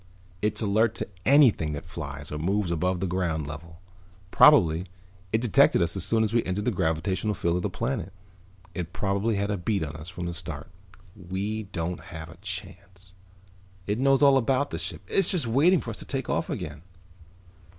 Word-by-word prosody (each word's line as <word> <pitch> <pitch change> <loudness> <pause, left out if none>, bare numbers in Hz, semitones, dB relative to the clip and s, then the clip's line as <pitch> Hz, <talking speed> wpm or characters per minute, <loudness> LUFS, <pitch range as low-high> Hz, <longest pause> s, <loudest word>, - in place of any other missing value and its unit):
It's 105 +1 0
alert 110 +2 +2
to - - -2 0.2
anything 125 - +5
that 75 - -6
flies 70 -4 -7
or 75 - -4
moves 95 +2 0
above 90 +2 0
the - - +1
ground 85 -4 -1
level. 80 +3 -9 0.5
Probably 90 - +6 0.4
it 110 - +1
detected 120 -5 +4
us 85 +1 +1
as 95 - -1
soon 110 +3 +2
as 110 0 -1
we 115 - +3
entered 95 +3 -2
the 125 - +2
gravitational 95 +3 -1
field 85 -1 0
of - - -2
the - - -1
planet. 115 -6 -3 0.6
It 90 -1 -5
probably 100 +3 0
had 100 +1 -1
a 100 - -1
bead 95 +1 -1
on 75 -1 -5
us 75 +3 -8
from 90 0 -6
the 85 - -3
start. 80 -2 -7 0.4
We 100 +3 -4
don't 85 0 -3
have 80 0 -9
a 85 - -13
chance. 95 0 -8 0.7
It 105 +3 -1
knows 135 +1 +4
all 140 -1 +7
about 135 +3 +1
the - - -3
ship. - - -5
It's 195 - +1
just 175 -8 0
waiting 145 +10 +4
for 115 - -5
us 110 - -8
to - - -8
take 135 -3 -3
off - - -1
again." 75 -1 -5
95 Hz, 190 wpm, -26 LUFS, 85-110 Hz, 0.7 s, all